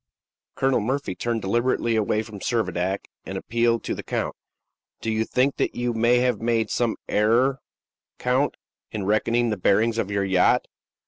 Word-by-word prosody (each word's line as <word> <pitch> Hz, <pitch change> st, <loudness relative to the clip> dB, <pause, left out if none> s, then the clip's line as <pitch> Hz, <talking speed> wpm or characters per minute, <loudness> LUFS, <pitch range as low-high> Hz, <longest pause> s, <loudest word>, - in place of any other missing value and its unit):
Colonel 135 Hz, -1 st, +2 dB
Murphy 130 Hz, 0 st, -2 dB
turned 115 Hz, +3 st, -2 dB
deliberately 120 Hz, +3 st, +1 dB
away 110 Hz, 0 st, +1 dB
from 110 Hz, -2 st, -10 dB
Servadac, 95 Hz, -4 st, -1 dB, 0.2 s
and -, -, -5 dB
appealed 115 Hz, 0 st, +1 dB
to -, -, -2 dB
the -, -, -5 dB
count: -, -, -3 dB, 0.6 s
"Do 115 Hz, -, -2 dB
you 110 Hz, -, -1 dB
not 110 Hz, -, -1 dB
think 130 Hz, +2 st, +2 dB, 0.2 s
you 120 Hz, 0 st, -1 dB
may 115 Hz, +2 st, +3 dB
have 125 Hz, -4 st, +1 dB
made 115 Hz, -2 st, +1 dB
some 120 Hz, -2 st, +1 dB
error, 120 Hz, +6 st, +2 dB, 0.6 s
count, 130 Hz, +3 st, +1 dB, 0.3 s
in 105 Hz, -3 st, -4 dB
reckoning 115 Hz, +3 st, +2 dB
the 105 Hz, -, -1 dB
bearings 110 Hz, +5 st, +2 dB
of 100 Hz, -, -1 dB
your 100 Hz, -1 st, 0 dB
yacht?" 95 Hz, -1 st, +3 dB
115 Hz, 160 wpm, -24 LUFS, 105-120 Hz, 0.6 s, may